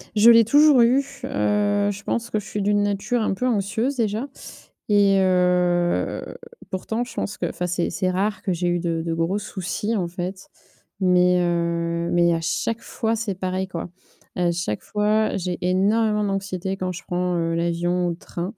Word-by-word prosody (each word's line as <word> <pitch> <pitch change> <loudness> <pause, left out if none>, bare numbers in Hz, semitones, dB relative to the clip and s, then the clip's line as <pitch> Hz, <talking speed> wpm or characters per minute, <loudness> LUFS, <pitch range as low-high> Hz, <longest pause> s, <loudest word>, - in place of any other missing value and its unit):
Je 215 +2 +7
l'ai 230 -1 +8
toujours 290 +3 +5
eu. 245 +4 +5 0.2
Heu 205 -6 +1
je 200 0 -8
pense 235 0 -2
que 215 - 0
je 210 - -10
suis 205 +1 -4
d'une 205 +1 +2
nature 205 +4 -1
un 215 - 0
peu 250 +6 -1
anxieuse 225 +4 0
déjà. 225 +1 -1 0.6
Et 200 -1 +4
heu 180 - +1 0.3
pourtant 220 +5 -2
je 245 - -11
pense 205 - -4
que - - -2
enfin 180 - -4
c'est 175 -1 -1
c'est 185 - -1
rare 200 +2 -1
que 195 - -2
j'ai 175 0 -1
eu 175 0 +1
de 165 -1 -1
de 165 - -1
gros 165 +4 0
soucis, 205 +2 -3
en 185 -5 -1
fait. 180 +2 -6 0.5
Mais, 180 -1 +4
heu, 170 0 -1
mais 170 0 +3
à 165 - -1
chaque 220 +7 -2
fois, 225 0 -2
c'est 215 -4 -3
pareil, 185 0 -2
quoi. 175 -2 -6 0.5
À 175 -1 +1
chaque 170 -11 -3
fois, 210 +1 0
j'ai 180 -2 -3
énormément 210 +4 +2
d'anxiété, 195 -1 -2
quand 185 -1 -3
je 180 +1 -8
prends, 180 -1 -1
heu, 165 0 -1
l'avion 175 +1 0
ou - - 0
le 170 - -3
train 180 +3 -6
190 Hz, 185 wpm, -23 LUFS, 175-210 Hz, 0.6 s, l'ai